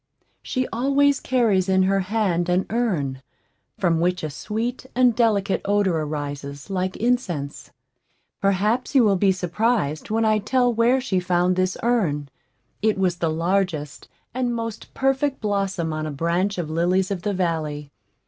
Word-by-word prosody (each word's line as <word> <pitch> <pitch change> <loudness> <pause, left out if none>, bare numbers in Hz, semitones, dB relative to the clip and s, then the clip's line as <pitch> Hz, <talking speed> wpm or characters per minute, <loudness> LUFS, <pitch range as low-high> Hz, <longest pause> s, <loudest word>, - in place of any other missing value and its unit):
She 255 -1 -2
always 275 +3 +2
carries 215 -7 +1
in 190 0 +4
her 195 +1 +2
hand 185 -3 0
an 180 +1 +2
urn, 165 - -1 0.6
from 170 -4 +1
which 175 0 0
a 155 - -3
sweet 230 - -4
and 250 -2 +4
delicate 210 -5 +2
odor 200 -3 +2
arises 145 0 -5
like 185 0 -2
incense. 190 - -2 0.7
Perhaps 210 +8 +1
you 260 - +7
will 205 -3 +4
be 195 +1 +3
surprised 185 -3 -1
when 225 +1 +1
I 215 -1 +3
tell 245 +2 +1
where 235 +3 +3
she 190 -8 0
found 180 0 +1
this 185 0 0
urn. 170 -13 0 0.5
It 215 -1 +2
was 185 -2 +1
the 165 -2 0
largest 165 -3 -1 0.3
and 245 -1 -1
most 230 -2 -5
perfect 270 +1 +1
blossom 195 -6 -1
on 155 0 -3
a - - -4
branch 170 +7 0
of 175 -3 -2
lilies 180 +4 +1
of 190 -3 -2
the 205 +1 -2
valley. 155 -5 -2
190 Hz, 155 wpm, -23 LUFS, 170-230 Hz, 0.7 s, you